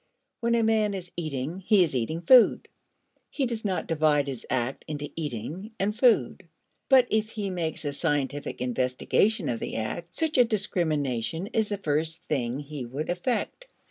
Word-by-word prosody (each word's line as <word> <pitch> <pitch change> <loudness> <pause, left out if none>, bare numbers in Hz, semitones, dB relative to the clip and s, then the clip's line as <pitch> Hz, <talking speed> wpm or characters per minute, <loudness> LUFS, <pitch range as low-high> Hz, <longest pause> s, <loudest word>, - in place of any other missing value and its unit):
When 235 0 +1
a 230 - +2
man 215 -2 +2
is 180 -2 -7
eating, 155 0 -3
he 195 0 +4
is 155 -5 -2
eating 130 +8 -1
food. 245 +6 +6 0.6
He 275 - -1
does 235 -3 -3
not 190 -3 -1
divide 150 -3 +2
his 135 -4 -6
act 130 +1 -1
into 145 -1 -5
eating 160 - -5
and 205 +2 0
food. 220 - +2 0.4
But 260 -2 +7
if 220 0 +1
he 210 -3 -4
makes 165 -3 -3
a 145 - -1
scientific 145 -3 -2
investigation 130 - +1
of 115 - -1
the - - -4
act, 115 +10 -4
such 315 -4 +1
a - - +9
discrimination 165 - -1
is 220 -2 +1
the 205 - -2
first 160 -2 -1
thing 125 -4 -1
he 145 -2 -6
would 140 +7 -4
effect. 245 - -2
165 Hz, 170 wpm, -27 LUFS, 140-210 Hz, 0.6 s, a